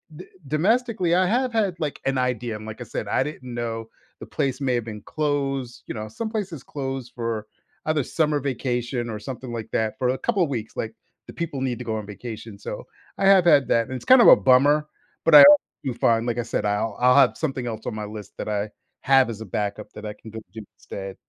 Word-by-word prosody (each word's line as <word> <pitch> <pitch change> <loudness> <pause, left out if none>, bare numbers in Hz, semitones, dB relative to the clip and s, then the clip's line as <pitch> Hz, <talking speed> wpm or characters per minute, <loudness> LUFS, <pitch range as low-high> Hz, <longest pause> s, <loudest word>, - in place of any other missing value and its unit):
d 180 - -10 0.2
domestically, 190 - +1
I 185 +1 +3
have 250 +6 +1
had, 210 -6 +1
like, 150 -3 -3
an 135 -1 +1
idea, 125 -3 -1
and 105 - -8
like 110 0 -8
I - - -5
said, - - -5
I - - +1
didn't 130 -4 -7
know 115 -1 -4 0.3
the - - -8
place 135 0 -2
may 130 -2 +1
have 120 -2 -2
been 105 -2 -7
closed, 135 -4 -2
you - - -4
know, 110 0 -5
some 220 - -5
places 190 - -4
close 135 -3 -5
for 115 -3 -4 0.4
either 155 -2 +1
summer 150 +1 0
vacation 125 -2 -2
or 105 -1 -5
something 130 +1 -7
like 115 -2 -5
that 110 -1 -1
for 125 -1 +1
a 130 - 0
couple 180 -5 +1
weeks, 115 -5 -5
like, 110 0 -3 0.3
the - - -10
people 165 -5 -4
need 125 -3 -1
to 125 - -7
go 110 -1 -2
on 105 - -5
vacation. 110 0 -8
So, - - -7 0.3
I 195 - 0
have 195 -2 +6
had 140 -5 +5
that, 115 -1 +2
and 130 - -5
it's - - -7
kind 255 -1 +8
of - - +7
a - - +11
bummer, 145 +4 +4 0.4
but 165 - +6
I - - +13
al 290 0 +10 0.2
do 130 -3 -2
fine, 115 -1 +2
like 120 -1 -1
I 120 - 0
said, 105 - -2
I'll 105 +1 -1
I'll 125 0 +5
have 135 -3 +5
something 135 -6 -3
else 110 -1 -5
on - - -3
my 105 -1 -4
list 105 -2 -9
that - - -4
I 105 0 -1 0.3
have 135 -3 +4
as 110 -1 -6
a 110 - -6
backup 105 +2 -4
that 105 - -9
I 105 - -4
can 110 +1 -13
go 110 - -6
do 110 - -7 0.2
instead. 95 -1 -7
125 Hz, 240 wpm, -24 LUFS, 110-150 Hz, 0.4 s, I